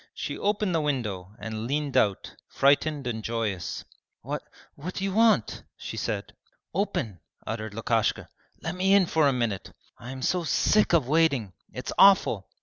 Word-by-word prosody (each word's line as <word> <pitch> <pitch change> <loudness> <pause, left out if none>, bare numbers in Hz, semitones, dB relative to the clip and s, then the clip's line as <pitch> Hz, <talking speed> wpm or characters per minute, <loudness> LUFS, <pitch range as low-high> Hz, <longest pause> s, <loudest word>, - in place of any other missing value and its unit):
She - - -4
opened 205 -2 0
the 165 - +2
window 105 -10 -3
and 110 +1 -5
leant 145 +1 -2
out, 100 -2 +1
frightened 145 +1 +2
and 110 -3 -3
joyous. 110 -6 -3 0.4
'What - - -3 0.3
what 175 +6 -7
do 195 - -3
you 195 -1 -1
want?' 225 +1 +3 0.2
she - - -7
said. - - -3 0.4
'Open!' 140 - -2 0.3
uttered 110 -2 -5
Lukashka. 115 -1 0 0.4
'Let 160 +2 -2
me 190 +2 +3
in 200 -2 +5
for 160 -3 +2
a - - +4
minute. 115 -7 -2 0.3
I 120 - -9
am 130 -1 -6
so 180 -1 +1
sick 205 +5 +2
of 155 -7 +3
waiting! 140 - +2 0.2
It's 125 - -5
awful!' 185 - +5
135 Hz, 160 wpm, -27 LUFS, 110-175 Hz, 0.4 s, in